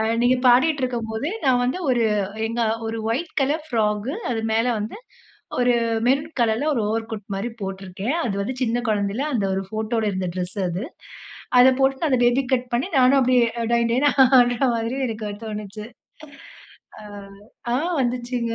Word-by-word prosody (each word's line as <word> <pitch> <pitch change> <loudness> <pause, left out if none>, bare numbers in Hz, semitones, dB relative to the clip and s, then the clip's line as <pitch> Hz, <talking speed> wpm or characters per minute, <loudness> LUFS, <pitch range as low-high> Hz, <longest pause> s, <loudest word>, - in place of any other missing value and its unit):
அ - - +2 0.2
நீங்க 250 +1 +4
பாடிட்டு 270 +4 +4
இருக்கும்போது, 235 +1 -2 0.2
நான் 250 -2 +3
வந்து 255 +9 -1
ஒரு 240 -2 +2 0.4
எங்க 230 +1 -3 0.3
ஒரு 225 0 -3
ஒயிட் 315 +9 -2
கலர் 295 +4 0
ஃப்ராக் 210 -1 0 0.2
அது 225 -2 -1
மேல 225 +2 +2
வந்து 210 - -5 0.6
ஒரு 245 0 +3 0.3
மெரூன் 285 +5 +1
கலர்ல 235 +6 +1
ஒரு 235 - 0
ஓவர் 225 +1 -2
கோட் 210 -3 -6
மாரி 200 +5 -3
போட்டிருக்கேன். 195 - -4
அது 200 - -2
வந்து 255 +6 -3
சின்ன 235 0 0
குழந்தையில 210 +5 0
அந்த 210 - 0
ஒரு 195 - -2
ஃபோட்டோட 220 +1 -2
இருந்த 185 -1 -2
ட்ரெஸ் 180 +2 -4
அது. 180 +7 -3 0.8
அதை 260 +1 +8
போட்டு 270 +4 +2
அந்த 255 -3 +2
பேபி 245 +3 +3
கட் 250 0 -2
பண்ணி 250 +8 0
நானும் 260 +2 +5
அப்பிடியே 250 -2 +3 0.3
டொயின் 235 0 +2
டொயின்னு 285 +4 +3 0.3
ஆடுறமாரி 240 0 +1
எனக்கு 215 -2 -4
தோணுச்சு. 210 0 -6 1.1
அ - - -11 0.7
ஆ - - +3 0.2
வந்துச்சுங்க. 240 -1 -2
235 Hz, 160 wpm, -22 LUFS, 215-255 Hz, 1.1 s, அதை